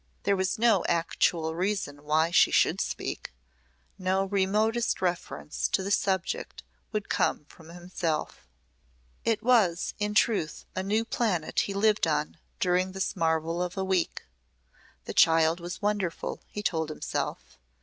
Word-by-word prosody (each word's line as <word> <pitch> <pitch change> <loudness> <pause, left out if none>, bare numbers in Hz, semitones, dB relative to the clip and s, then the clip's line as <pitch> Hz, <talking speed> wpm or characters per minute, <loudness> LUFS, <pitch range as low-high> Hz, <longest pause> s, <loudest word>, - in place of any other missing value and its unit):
There 200 0 +2
was 190 -1 0
no 220 -5 +4
actual 165 -1 +1
reason 175 -5 -2
why 155 +2 +2
she - - +6
should - - +3
speak. - - -4 0.7
No 190 +1 +1
remotest 210 +4 +1
reference 175 -4 -2
to 190 - 0
the 200 - -3
subject 190 -3 -1 0.3
would 210 -2 -2
come 150 - 0
from 160 +1 -16
himself. 170 - -4 0.8
It 225 -1 +1
was 215 -9 +3
in 210 0 -1
truth 205 -9 +1
a 185 - -1
new 215 +4 0
planet 205 -9 0
he 200 - -1
lived 210 -2 +3
on 150 +1 -1 0.2
during 185 +1 +1
this 190 +1 -2
marvel 165 0 0
of 180 0 -3
a 190 - 0
week. 190 -2 0 0.8
The - - -5
child 165 +1 +4
was 175 +4 -7
wonderful, 205 -5 -2
he 210 - -6
told 160 -5 0
himself. 65 - -4
185 Hz, 140 wpm, -28 LUFS, 165-205 Hz, 0.8 s, she